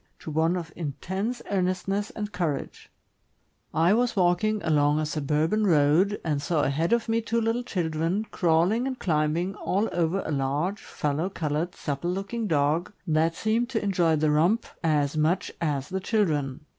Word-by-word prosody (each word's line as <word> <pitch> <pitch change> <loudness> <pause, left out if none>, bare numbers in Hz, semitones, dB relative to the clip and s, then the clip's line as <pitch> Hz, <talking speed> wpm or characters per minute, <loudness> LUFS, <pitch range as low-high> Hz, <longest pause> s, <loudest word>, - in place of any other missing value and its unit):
to 155 - -8
one 165 +4 +2
of 165 -2 -6
intense 190 - -4
earnestness 195 +2 0
and 210 -1 -4
courage 160 -8 -3 0.8
I 165 +4 +3
was 240 +1 +1
walking 190 +4 +2
along 150 -2 +3
a 155 - 0
suburban 155 +8 0
road, 165 +5 +3
and 150 -3 0
saw 150 +1 0
ahead 155 +5 0
of 235 0 +2
me 225 0 +1
two 230 +1 0
little 230 +2 0
children 175 -2 -1
crawling 180 +9 +2
and 260 -1 -3
climbing 165 +2 0
all 205 +2 -1
over 175 +3 0
a - - -3
large, 145 +8 -1
fallow 150 +5 -2
colored, 160 -1 -2
supple 145 +3 -3
looking 200 +5 -3
dog, 155 +2 +1
that 165 0 +1
seemed 225 +5 0
to 225 -5 -1
enjoy 175 -5 +2
the 155 0 +2
romp 175 +10 +2 0.2
as 150 -2 +1
much 160 +4 +1
as 145 -4 -1
the 190 0 -2
children. 160 - 0
170 Hz, 160 wpm, -26 LUFS, 155-205 Hz, 0.8 s, I